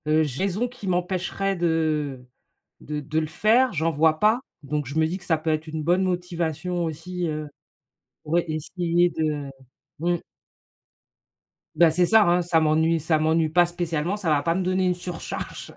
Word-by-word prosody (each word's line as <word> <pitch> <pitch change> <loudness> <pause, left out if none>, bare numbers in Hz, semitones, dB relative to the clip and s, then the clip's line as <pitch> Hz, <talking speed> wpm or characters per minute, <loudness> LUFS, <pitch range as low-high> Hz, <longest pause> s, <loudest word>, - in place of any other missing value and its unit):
Heu, 155 +1 +4
raisons 190 - -1
qui 245 -5 -10
m'empêcheraient 185 +2 -1
de 155 -6 -1 0.5
de 150 0 -5
de 155 +2 -1
le 155 - -2
faire, 225 +11 +3
j'en 165 0 0
vois 155 +1 +2
pas. 220 +4 +3 0.2
Donc 145 0 -3
je 140 - -7
me 160 - +4
dis 175 +3 -3
que - - -16
ça 160 - +2
peut 155 +1 -1
être 155 +1 -2
une 155 0 -4
bonne 175 +4 +2
motivation 175 -1 -2
aussi, 170 +3 -4
heu, 155 -1 -4 0.8
ouais, 170 +3 +1
essayer 170 +2 0
de, 150 -3 -2 0.5
mmh. 175 +1 +1 1.6
Bah, 165 +1 +6
c'est 175 +3 +3
ça, 220 +4 +6
hein, 175 +1 +3
ça 170 -1 +2
m'ennuie 160 +1 +2
ça 160 +1 +1
m'ennuie 160 +1 +2
pas 175 +2 +4
spécialement, 175 +1 -2
ça 190 -6 -2
va 150 -2 +3
pas 165 +3 +1
me 190 - 0
donner 185 +1 +1
une 180 - +2
surcharge. 175 -1 -6
165 Hz, 175 wpm, -24 LUFS, 155-180 Hz, 1.6 s, Bah